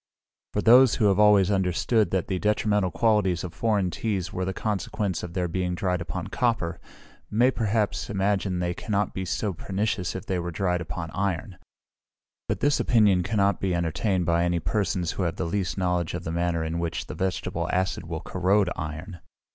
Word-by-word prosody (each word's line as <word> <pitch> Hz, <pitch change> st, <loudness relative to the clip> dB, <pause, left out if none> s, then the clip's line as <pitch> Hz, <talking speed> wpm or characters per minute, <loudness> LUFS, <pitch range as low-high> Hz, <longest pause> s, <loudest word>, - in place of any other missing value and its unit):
For 105 Hz, -, 0 dB
those 125 Hz, +1 st, +7 dB
who 110 Hz, -, +1 dB
have 100 Hz, +1 st, +2 dB
always 105 Hz, -2 st, +5 dB
understood 95 Hz, +2 st, +1 dB
that 95 Hz, -1 st, 0 dB
the 95 Hz, -2 st, -1 dB
detrimental 105 Hz, -2 st, +1 dB
qualities 100 Hz, -4 st, +1 dB
of 90 Hz, -2 st, -6 dB
foreign 100 Hz, -2 st, 0 dB
teas 95 Hz, -1 st, -2 dB
were 95 Hz, -, -2 dB
the 95 Hz, -, -1 dB
consequence 105 Hz, -1 st, -2 dB
of 85 Hz, -1 st, -7 dB
their 90 Hz, -1 st, 0 dB
being 90 Hz, +1 st, -2 dB
dried 90 Hz, -2 st, -1 dB
upon 85 Hz, -2 st, -4 dB
copper, 115 Hz, -9 st, 0 dB, 0.5 s
may 120 Hz, +5 st, +3 dB
perhaps 110 Hz, -1 st, -1 dB
imagine 100 Hz, -2 st, 0 dB
they 90 Hz, 0 st, -1 dB
cannot 105 Hz, +2 st, -1 dB
be 95 Hz, -, -3 dB
so 100 Hz, +2 st, -1 dB
pernicious 95 Hz, +1 st, -2 dB
if 95 Hz, -, -5 dB
they 95 Hz, -2 st, -1 dB
were 85 Hz, 0 st, -3 dB
dried 90 Hz, +1 st, -1 dB
upon 85 Hz, -1 st, -5 dB
iron; 95 Hz, -1 st, -2 dB, 0.9 s
but -, -, -2 dB
this 145 Hz, 0 st, +3 dB
opinion 105 Hz, -6 st, +4 dB
cannot 100 Hz, +1 st, +1 dB
be 95 Hz, -2 st, 0 dB
entertained 85 Hz, +3 st, 0 dB
by 85 Hz, 0 st, +2 dB
any 85 Hz, 0 st, +1 dB
persons 95 Hz, -2 st, -1 dB
who -, -, -4 dB
have 85 Hz, -3 st, -1 dB
the 90 Hz, -, -3 dB
least 90 Hz, +2 st, -2 dB
knowledge 90 Hz, -3 st, 0 dB
of -, -, -5 dB
the 80 Hz, -, -4 dB
manner 85 Hz, -1 st, 0 dB
in 80 Hz, +1 st, -2 dB
which 85 Hz, -1 st, -3 dB
the -, -, -7 dB
vegetable 95 Hz, -1 st, -2 dB
acid 95 Hz, -2 st, -1 dB
will 80 Hz, -1 st, -4 dB
corrode 95 Hz, +2 st, +1 dB
iron. 80 Hz, +4 st, -6 dB
95 Hz, 185 wpm, -26 LUFS, 85-105 Hz, 0.9 s, those